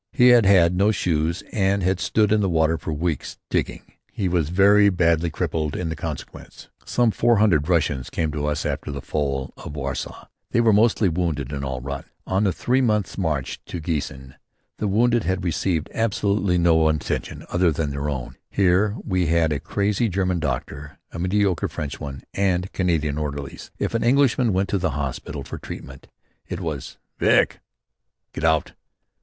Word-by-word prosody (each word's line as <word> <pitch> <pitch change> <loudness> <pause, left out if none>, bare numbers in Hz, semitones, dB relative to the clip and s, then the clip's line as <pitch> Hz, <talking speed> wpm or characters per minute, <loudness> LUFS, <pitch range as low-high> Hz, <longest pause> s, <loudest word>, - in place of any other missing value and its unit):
He 125 0 +5
had 120 -5 +6
had 90 -3 +5
no 100 +4 +3
shoes 85 -4 0
and 100 -2 +1
had 95 0 +1
stood 105 +1 +2
in 110 -1 +3
the 95 - +1
water 80 -1 +2
for - - -4
weeks, 80 -1 -3
digging. - - -1 0.3
He 95 - -2
was 85 -4 0
very 100 +3 +5
badly 85 -2 +2
crippled 75 -1 -2
in 85 -3 -2
consequence. 75 - -8
Some 120 -2 +2
four 120 +2 +3
hundred 90 -7 +3
Russians 75 -7 +1
came 80 -2 -1
to 75 0 -2
us 75 0 -1
after - - -3
the 70 -2 -5
fall 70 -3 -2
of 75 - -8
Warsaw. 70 -2 -5 0.2
They - - +1
were 115 -2 +4
mostly 110 0 +4
wounded 80 -6 -1
and 70 -1 -4
all 65 -2 -3
rotten. 70 +1 -6 0.2
On 95 +3 +1
the 95 - +3
three 125 +8 +1
months' 105 -6 0
march 80 -8 -2
to 90 - -5
Giessen 70 -4 -4 0.5
the 105 - 0
wounded 120 +3 +2
had 95 +2 -1
received 85 -1 -1
absolutely 100 -4 +1
no 80 -2 +4
attention 80 -2 -3
other 90 -1 +2
than 75 -1 -2
their 70 +1 -3
own. 65 -4 -5
Here 100 +2 +2
we 90 -4 0
had 80 -1 +2
a 70 - -2
crazy 105 +7 0
German 90 -1 0
doctor, 70 0 -4
a - - -7
mediocre 95 0 +1
French 75 -2 -5
one 70 -2 -7
and 95 -2 0
Canadian 80 -5 0
orderlies. 70 -2 -5
If - - -2
an 115 - 0
Englishman 125 -1 +3
went 95 +1 0
to 100 - 0
the 85 -6 -1
hospital 70 0 -4
for - - -7
treatment 70 0 -9 0.4
it 85 - -4
was 80 -7 -5 0.2
"Vick!" - - +3 0.7
Get - - -6
out. 80 -2 +2
85 Hz, 175 wpm, -23 LUFS, 75-100 Hz, 0.7 s, had